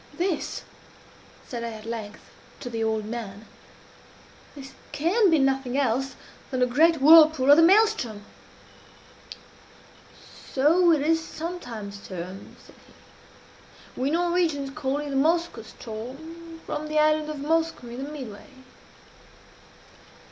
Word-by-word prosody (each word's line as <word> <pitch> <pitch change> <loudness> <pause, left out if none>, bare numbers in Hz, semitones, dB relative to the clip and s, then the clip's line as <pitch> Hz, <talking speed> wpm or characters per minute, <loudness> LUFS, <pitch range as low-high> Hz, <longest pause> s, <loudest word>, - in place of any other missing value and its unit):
"This," 350 +1 -2 0.8
said 235 -2 -5
I 230 -1 -4
at 215 0 -11
length, 220 -2 -6 0.4
to 245 - -6
the 225 -1 -2
old 220 -1 -1
man 215 -2 -7 1.1
"this 270 -2 -10 0.2
can 370 +8 +2
be 325 - +4
nothing 270 -2 0
else 270 0 0 0.3
than 260 - -3
the - - +5
great 315 +6 +3
whirlpool 305 -2 +7
of 290 - +8
the - - +7
Maelström." 370 - +3 2.3
"So 335 +6 +4
it 305 -3 +2
is 325 +1 +1
sometimes 245 - -7
termed," 185 0 -9
said - - -18
he. - - -18
"We 265 - +1
Norwegians 335 -4 0
call 275 -1 -2
it 295 -1 -5
the - - -3
Moskoe 330 -2 +1
ström, 315 +10 -10
from 305 - -5
the 305 0 -2
island 305 0 +3
of 305 - -5
Moskoe 320 -3 -1
in 250 +3 -6
the 290 - -7
midway." 250 -9 -9
280 Hz, 125 wpm, -25 LUFS, 235-325 Hz, 2.3 s, of